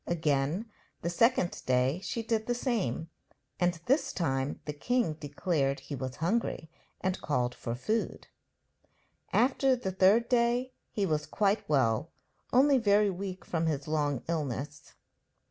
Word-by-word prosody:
Again 155 +3 0 0.4
the 170 - -1
second 230 -1 +2
day 130 +5 +2
she 230 - -3
did 220 -1 -1
the 245 - +1
same, 195 - -1 0.5
and 175 0 +2
this 275 +8 +2
time 135 -4 -1
the 150 - -3
king 240 +3 0
declared 145 -1 -1
he 145 - -6
was 130 -1 -5
hungry, 170 -2 -1 0.3
and 190 0 -1
called 125 -4 0
for 115 -1 -4
food. 215 - -2 1.1
After 265 +1 +3
the 240 -6 -3
third 195 +5 +4
day 245 +1 +2 0.2
he 205 - -1
was 155 -4 -1
quite 205 -3 0
well, 130 0 +2 0.4
only 270 +1 +5
very 205 -2 +4
weak 185 0 -6
from 165 -1 -1
his 145 -2 -2
long 145 -4 0
illness. 145 -2 -4
170 Hz, 140 wpm, -30 LUFS, 145-225 Hz, 1.1 s, only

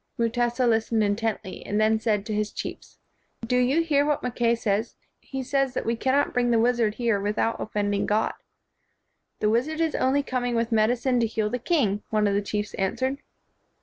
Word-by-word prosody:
Mutesa 240 +2 +1
listened 225 -1 +2
intently, 210 -1 -2
and 205 - -1
then 220 0 +3
said 210 -2 0
to 215 - -3
his 210 0 -1
chiefs, - - -7 0.5
"Do 250 - 0
you 255 +6 +3
hear 290 -3 +2
what 295 0 0
Mackay 240 -1 +1
says? 220 0 -1 0.2
He 270 -1 -6
says 275 0 0
that - - -2
we 230 - +1
cannot 265 +4 +1
bring 245 -1 +1
the 235 - +3
wizard 230 -2 +2
here 230 -4 +1
without 210 +3 -1
offending 205 -1 -1
God." 215 +1 +1
1 - - -20 0.6
' - - -51
The 210 - +3
wizard 280 +8 0
is 325 -2 +1
only 275 +2 +1
coming 245 -2 -2
with 230 +1 0
medicine 240 +3 +2
to 230 - +2
heal 215 -1 -2
the 250 - -2
king," 230 - +1
one 215 -1 +1
of 200 - +2
the 200 - +1
chiefs 210 +1 -3
an 190 -1 0
swered. 260 +1 -1
230 Hz, 200 wpm, -25 LUFS, 215-255 Hz, 0.6 s, then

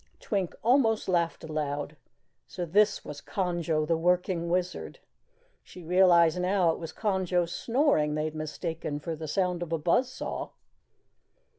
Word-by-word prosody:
Twink 195 -5 -2
almost 230 -3 +3
laughed 170 -3 0
aloud. 150 -1 -3 0.5
So 180 - -4
this 200 +4 +2
was 145 -1 -7
Conjo, 170 -5 -1
the 165 +1 +1
working 175 0 +1
Wizard! 180 +1 -2 0.6
She 180 - -13
realized 175 -1 +4
now 180 -2 +3
it - - -5
was 165 -1 -6
Conjo's 185 -4 0
snoring 230 - +1
they 155 0 -1
had 155 - -3
mistaken 155 -1 -4
for 160 +2 -4
the 155 0 -7
sound 180 +1 0
of 170 -2 -5
a 165 - +1
buzz 175 - +2
saw. - - -5
175 Hz, 145 wpm, -28 LUFS, 160-190 Hz, 0.6 s, realized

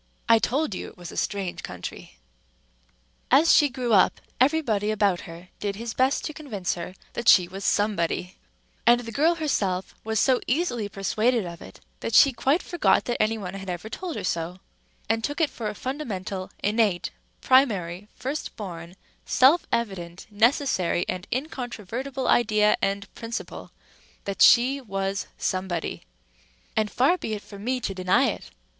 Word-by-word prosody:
I 230 0 +6
told 260 +2 0
you - - -5
it - - -14
was 175 -1 -9
a - - -10
strange 195 -3 -2
country. 90 -7 -8 1.1
As 295 +6 +6
she 290 - +5
grew 245 -2 -2
up, 190 - +4 0.2
everybody 250 -7 +2
about 205 -4 +1
her 170 +2 -11
did 200 -1 -2
his 230 +2 -5
best 260 +2 +1
to 310 - -4
convince 220 - -3
her 175 +1 -7 0.2
that 235 - +1
she 180 -2 +7
was 195 +2 -8
Somebody; 185 -4 0 0.5
and 240 +1 +6
the 230 -1 -7
girl 315 +8 +3
herself 200 - -1
was 220 -1 0
so 260 -2 +3
easily 245 -7 0
persuaded 215 +3 0
of 170 -1 -8
it - - -12 0.2
that 230 - -2
she 275 - +7
quite 270 +8 +1
forgot 345 - +2
that 240 - -1
anybody 210 -3 -1
had 195 -1 -7
ever 180 +4 -5
told 350 +7 -5
her - - -4
so, 170 +1 -2 0.5
and 225 +1 0
took 290 +6 -2
it 320 -3 +2
for 225 - -5
a 210 - -6
fundamental, 205 -8 -4
innate, 205 -3 +1 0.3
primary, 205 -8 +2
first 280 +4 -4
born, 175 -4 -8 0.3
self 285 +7 +4
evident, 185 -6 -3
necessary, 220 - +2
and 185 -1 -4
incontrovertible 255 -1 -4
idea 215 -3 +4
and 200 0 -2
principle 230 +1 -6 0.5
that 200 -1 -4
she 265 +4 +6
was 195 -3 -3
Somebody. 185 - -3 0.7
And 215 -1 +1
far 285 - +2
be 220 - -3
it 210 - -8
from 200 -1 -11
me 255 +2 0
to 195 - -2
deny 185 -1 +2
it. - - -6
215 Hz, 160 wpm, -25 LUFS, 190-255 Hz, 1.1 s, she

